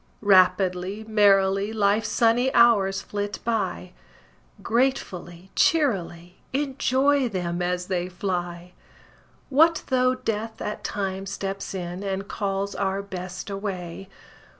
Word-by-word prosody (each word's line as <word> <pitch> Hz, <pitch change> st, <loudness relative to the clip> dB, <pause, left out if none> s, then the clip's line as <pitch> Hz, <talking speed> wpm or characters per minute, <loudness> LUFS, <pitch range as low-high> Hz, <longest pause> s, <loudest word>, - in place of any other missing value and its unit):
Rapidly, 185 Hz, +1 st, +3 dB
merrily, 200 Hz, -1 st, +3 dB
Life's 210 Hz, 0 st, +1 dB
sunny 235 Hz, +3 st, +3 dB
hours 200 Hz, -5 st, +4 dB
flit 205 Hz, 0 st, -4 dB
by, 200 Hz, -5 st, -2 dB, 0.7 s
Gratefully, 190 Hz, -8 st, -1 dB
cheerily 190 Hz, -, +1 dB, 0.2 s
Enjoy 275 Hz, -1 st, +1 dB
them 180 Hz, -3 st, -3 dB
as 180 Hz, 0 st, -1 dB
they 180 Hz, -1 st, -2 dB
fly! 175 Hz, -1 st, -4 dB, 0.8 s
What 320 Hz, +4 st, +4 dB
though 255 Hz, -1 st, +3 dB
Death 225 Hz, -3 st, -4 dB
at 210 Hz, -, -5 dB
times 195 Hz, -1 st, -3 dB
steps 195 Hz, 0 st, -4 dB
in, 180 Hz, 0 st, -5 dB
And 195 Hz, 0 st, -3 dB
calls 200 Hz, -1 st, -2 dB
our 195 Hz, 0 st, -1 dB
Best 185 Hz, 0 st, -7 dB
away? 195 Hz, -2 st, -5 dB
195 Hz, 105 wpm, -25 LUFS, 185-225 Hz, 0.8 s, hours